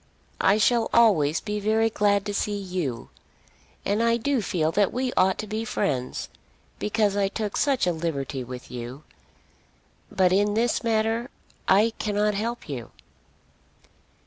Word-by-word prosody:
I 200 +2 +4
shall 230 +1 +2
always 175 -10 +4
be 210 0 -3
very 220 +2 +2
glad 205 -1 +2
to 205 - -3
see 205 0 -1
you, 180 -11 -4 0.8
and 205 +3 +1
I 230 0 +3
do 265 +1 0
feel 165 -5 0
that 200 +2 +2
we 255 0 -2
ought 185 +1 +3
to 215 - -4
be 215 +1 -3
friends, 130 - -2 0.5
because 210 -1 +1
I 200 -1 +2
took 210 +1 -4
such 275 -7 +2
a 180 - +2
liberty 145 -5 -3
with 125 0 -9
you. 125 +4 -7 1.1
But 185 -1 +3
in 205 +2 +2
this 235 +2 +1
matter 225 +2 0 0.4
I 210 +4 +4
cannot 210 0 +1
help 230 +4 -3
you." 125 -7 -6
205 Hz, 145 wpm, -25 LUFS, 170-225 Hz, 1.1 s, I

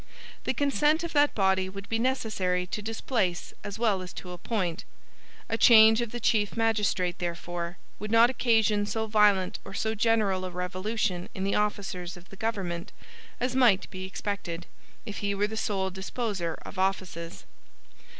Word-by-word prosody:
The - - 0
consent 295 +2 +2
of 340 - -4
that 290 -1 +3
body 190 -2 +2
would 195 +1 -8
be 225 - -1
necessary 215 -8 0
to 210 - -4
displace 220 -4 -2
as 205 -1 -5
well 215 -5 +1
as 180 -3 -8
to 180 - -8
appoint. 180 -2 -2 0.6
A 225 - -2
change 220 0 +8
of 235 - -2
the 240 - -4
Chief 215 -2 +1
Magistrate, 210 -6 +1
therefore, 175 0 -4 0.2
would 210 +2 -5
not 230 +2 +6
occasion 220 -4 +2
so 220 +1 -1
violent 210 -4 +3
or 195 - -9
so 220 +1 0
general 215 -4 +2
a 185 - -3
revolution 180 +1 -2
in 190 - -3
the 195 - 0
officers 195 -4 -2
of 175 +1 -15
the - - -11
government 190 -5 -3 0.5
as 250 +1 -1
might 235 -7 +4
be 185 -1 -6
expected, 190 -3 -4 0.4
if 210 -3 -6
he 200 -1 -1
were 205 +1 +1
the 215 +1 -5
sole 195 -3 -1
disposer 190 -3 -3
of 190 - -7
offices. 185 -3 -2
200 Hz, 165 wpm, -28 LUFS, 185-225 Hz, 0.6 s, change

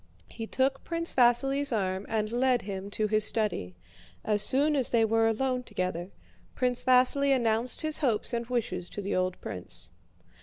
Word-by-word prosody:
He 225 -1 -7
took 270 +2 0
Prince 335 0 -3
Vasíli's 270 +3 +3
arm 190 -3 -2
and 215 -1 -1
led 250 0 +1
him 195 0 -6
to 215 +1 -1
his 215 0 +2
study. 205 - 0 0.5
As 210 -1 +1
soon 290 +6 +2
as 265 -4 +1
they 230 -2 +3
were 225 +1 +2
alone 255 +3 0
together, 185 -6 -4 0.5
Prince 250 -1 -1
Vasíli 255 +2 +5
announced 235 0 0
his 310 -1 0
hopes 245 -4 0
and 235 -1 -2
wishes 205 -8 -3
to 205 - -6
the 200 - -2
old 185 0 -1
prince. 90 - -6
230 Hz, 165 wpm, -28 LUFS, 210-260 Hz, 0.5 s, Vasíli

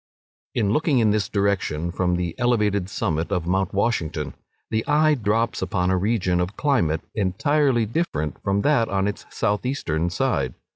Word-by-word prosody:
In 105 -4 +1
looking 150 0 +2
in 110 -3 +4
this 105 -1 0
direction 95 -5 0
from 90 0 0
the 85 -1 -2
elevated 105 -6 +1
summit 85 -5 -2
of 90 -4 0
Mount 95 +2 0
Washington, 85 - -1 0.4
the 110 0 0
eye 155 +1 +4
drops 115 -2 0
upon 90 -3 0
a - - +3
region 95 -3 +1
of 90 +3 -2
climate 85 - +1
entirely 120 - +1
different 100 - -2
from 100 +1 0
that 140 -6 +3
on 95 0 0
its 105 - -5
south 105 0 -1
eastern 85 - -1
side. 90 - -1
100 Hz, 160 wpm, -23 LUFS, 90-115 Hz, 0.4 s, in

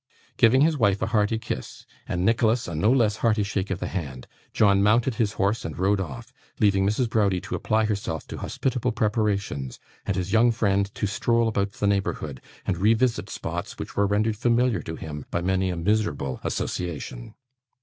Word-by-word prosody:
Giving 125 +4 +5
his 155 -1 +3
wife 100 -3 +3
a - - -3
hearty 105 +1 +2
kiss, 110 - -6 0.2
and 90 +1 -1
Nicholas 115 +1 +2
a 85 - -5
no 95 +9 +2
less 110 -5 +3
hearty 110 -2 +2
shake 100 -1 -2
of 95 - -1
the - - -3
hand, 70 -9 -5 0.3
John 100 -2 +4
mounted 115 +5 +3
his 105 -2 +1
horse 105 +2 0
and 80 - -6
rode 95 +2 +2
off: 120 +7 -7 0.3
leaving 100 -2 +3
Mrs. 115 +4 +1
Browdie 100 -4 +1
to - - -7
apply 110 0 +1
herself 100 -8 -3
to - - -6
hospitable 125 -3 -1
preparations, 105 - -1 0.3
and 100 - 0
his 95 +1 -2
young 115 +2 +5
friend 100 -3 +1
to - - -1
stroll 115 +3 +1
about 100 -2 -1
the 105 - -2
neighbourhood, 95 -9 -1 0.2
and 90 - 0
revisit 115 +4 +2
spots - - -5
which - - -7
were 100 0 +2
rendered 105 +2 +1
familiar 120 -3 +2
to 80 - -6
him 75 -3 -7
by - - -1
many 95 0 +1
a 90 - -2
miserable 85 -9 0
association. 75 -8 -4
105 Hz, 185 wpm, -25 LUFS, 95-115 Hz, 0.3 s, Giving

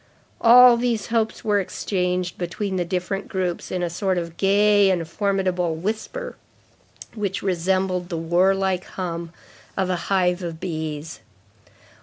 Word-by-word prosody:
All 245 +1 +8
these 235 -3 -1
hopes 220 -1 0
were 205 -1 +2
exchanged 180 -2 -2
between 190 +2 -3
the 180 - +1
different 185 +2 -3
groups 185 -3 -3
in 180 -1 -2
a 175 - -1
sort 185 +1 -1
of 170 -1 -4
gay 205 +1 +4
and 175 -4 0
formidable 185 -3 0
whisper 220 - -4 0.8
which 200 -3 -3
resembled 185 0 0
the 170 - -3
warlike 185 +3 +1
hum 170 -2 -5 0.5
of 190 -1 0
a - - +1
hive 180 -2 +2
of 165 -2 -5
bees. 160 -2 -5
185 Hz, 135 wpm, -23 LUFS, 175-200 Hz, 0.8 s, All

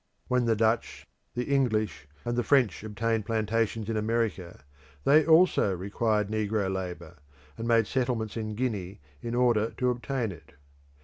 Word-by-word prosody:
When 125 -1 +1
the 115 -1 +2
Dutch, 110 +2 0 0.3
the 125 - -1
English, 110 - 0 0.2
and 120 0 -1
the 120 - +2
French 125 -7 +2
obtained 110 0 -1
plantations 115 -1 0
in 115 - -2
America, 110 -7 -2 0.4
they 150 - +5
also 160 - +4
required 105 +3 0
negro 105 -2 -1
labour, 90 -3 -6 0.4
and 115 0 -5
made 115 -1 +4
settlements 120 -4 -1
in 110 -2 -4
Guinea 105 -6 -3 0.2
in 120 0 -4
order 120 -3 +3
to 125 -1 +2
obtain 120 -2 -2
it. 80 -3 -14
110 Hz, 145 wpm, -28 LUFS, 105-120 Hz, 0.4 s, they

